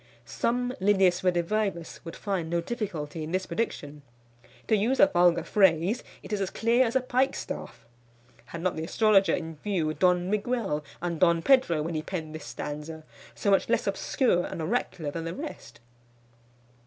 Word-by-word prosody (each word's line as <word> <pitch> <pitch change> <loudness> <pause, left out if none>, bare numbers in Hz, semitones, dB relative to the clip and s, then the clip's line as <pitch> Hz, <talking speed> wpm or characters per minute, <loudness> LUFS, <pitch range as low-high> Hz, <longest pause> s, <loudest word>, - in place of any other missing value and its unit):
Some 240 - -1
Lillius 190 -3 +3
Redivivus 180 0 -1
would 165 -1 -8
find 185 -5 -3
no 170 0 +1
difficulty 170 -7 -4
in 155 +1 -5
this 185 +1 -1
prediction. 150 -10 -4 0.7
To 220 - +4
use 230 +6 +1
a - - +9
vulgar 175 - +3
phrase, 190 +3 +2 0.2
it - - -6
is 205 - -1
as 190 - -1
clear 235 +5 +2
as 230 - -4
a 260 - +4
pikestaff. 255 - -2 0.6
Had 170 0 -8
not 185 - 0
the 160 - -4
astrologer 200 +2 +3
in 160 -2 -6
view 165 -4 -1
Don 180 +1 +2
Miguel 210 -6 -1 0.2
and 170 -2 -2
Don 170 -2 +3
Pedro 250 - +4
when 165 +2 -3
he 155 - -1
penned 160 -2 -5
this 155 - -8
stanza, 150 +2 -6 0.3
so 200 - 0
much 195 - +3
less 235 - +1
obscure 195 -1 +1
and - - -6
oracular 165 -4 -2
than 165 +2 -5
the 165 - -4
rest? 300 +2 -8
180 Hz, 165 wpm, -27 LUFS, 160-215 Hz, 0.7 s, a